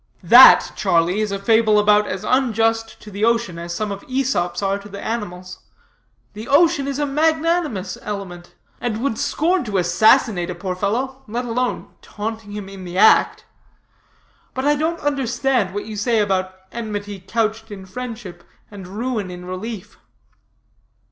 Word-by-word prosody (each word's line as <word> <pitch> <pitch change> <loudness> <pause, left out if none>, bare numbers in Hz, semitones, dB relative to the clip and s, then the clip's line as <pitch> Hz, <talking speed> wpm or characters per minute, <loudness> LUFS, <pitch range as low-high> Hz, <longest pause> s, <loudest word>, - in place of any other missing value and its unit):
"That, - - +8
Charlie, 175 +5 +1
is 210 -2 -2
a 200 - -2
fable 220 +1 +3
about 210 0 +4
as 190 - -4
unjust 225 -3 0
to 210 - -11
the 200 +2 -4
ocean, 230 -7 +1
as 170 0 -5
some 215 +1 -3
of 200 - -6
Æsop's 220 -10 -1
are 195 0 0
to 205 +1 -12
the 200 0 -8
animals. 185 -5 -5 0.7
The 215 +3 -8
ocean 285 -1 +3
is 275 -1 -3
a 295 - 0
magnanimous 310 - 0
element, 185 -4 -7 0.2
and 235 -3 -2
would 275 -6 -1
scorn 350 +4 0
to 205 -3 -2
assassinate 185 +1 +3
a 180 - -4
poor 190 -2 -4
fellow, 250 +8 -2
let 240 +4 -3
alone 245 +1 -3
taunting 220 0 -6
him 205 -2 -6
in 195 -1 -10
the 180 0 -6
act. 215 - +4 1.1
But 260 +1 -2
I 295 0 +4
don't 320 +3 -1
understand 270 -6 0
what 205 +2 -5
you 215 0 -7
say 225 +3 0
about 190 -3 0 0.2
enmity 205 -3 -5
couched 220 +3 -2
in 195 -2 -9
friendship, 210 -4 -8 0.3
and 195 -3 -10
ruin 215 0 -3
in 180 0 -9
relief." 185 +3 -7
215 Hz, 160 wpm, -20 LUFS, 195-250 Hz, 1.1 s, That